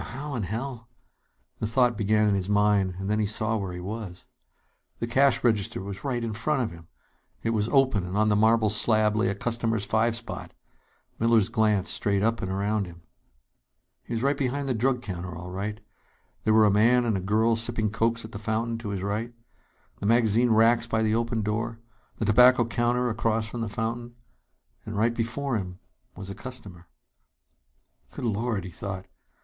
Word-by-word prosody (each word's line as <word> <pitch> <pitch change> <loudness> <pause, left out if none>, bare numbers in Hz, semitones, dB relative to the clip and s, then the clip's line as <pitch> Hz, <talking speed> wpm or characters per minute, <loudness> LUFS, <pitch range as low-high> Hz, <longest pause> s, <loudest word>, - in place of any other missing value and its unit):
"Now, - - -6
how 140 +4 -6
in 120 - -2
hell 115 +4 -5 0.4
" - - -44
The 110 - -1
thought 120 +1 +2
began 105 0 +2
in 105 - +3
his 95 0 -1
mind; 105 -2 +2
and 95 +1 -5
then 105 +1 +1
he 105 - +1
saw 110 +2 +1
where 100 -3 -4
he 90 - -6
was. 95 -1 -6 0.7
The - - -2
cash 135 +3 +3
register 110 -5 +1
was 100 0 -7
right 125 -4 -2
in 115 -2 -3
front 130 +5 0
of 115 - -3
him! 85 -1 -13 0.6
It 115 - 0
was 110 0 0
open, 130 -8 +3
and 90 +3 -4
on 110 0 +3
the 105 - +3
marble 110 0 +3
slab 110 0 +3
lay 110 +2 +2
a 100 - -1
customer's 115 -1 -1
five 115 +2 +1
spot. 115 0 -6 0.7
Miller's 115 -3 +3
glance 105 -3 +1
strayed 100 -1 +1
up 115 +1 +1
and 95 - -3
around 100 +1 -1
him. 85 -1 -13 1.0
He - - -5
was 135 +5 +1
behind 140 +1 -2
the 130 - +1
drug 125 +2 0
counter, 90 -4 -5
all 90 +1 -8
right. 105 +3 -4 0.7
There 110 - +4
were 110 -1 +6
a 105 - +4
man 120 +4 +4
and 115 -3 +1
a - - 0
girl 110 +4 +2
sipping 115 -2 -1
cokes 115 +1 0
at 110 - -10
the 100 - -7
fountain, 115 +2 -2
to 110 -2 -6
his 100 -2 -3
right; 105 +4 -2 0.7
the 100 - -2
magazine 115 +1 +3
racks 115 +1 +4
by 110 -1 0
the 110 0 +1
open 115 -1 0
door; 115 +2 -2 0.4
the 110 - -2
tobacco 125 +3 +6
counter 120 +2 0
across 110 0 0
from 115 +1 -6
the 115 - -2
fountain. 115 +3 -4 0.7
And 110 -1 -6
right 115 +3 +2
before 120 +3 -2
him 90 -3 -6 0.4
was 100 0 -7
a - - -5
customer. 100 -6 -10 1.3
Good - - -5
Lord! 110 -2 -1
he 95 - -8
thought. 95 +1 -6
110 Hz, 195 wpm, -26 LUFS, 100-115 Hz, 1.3 s, were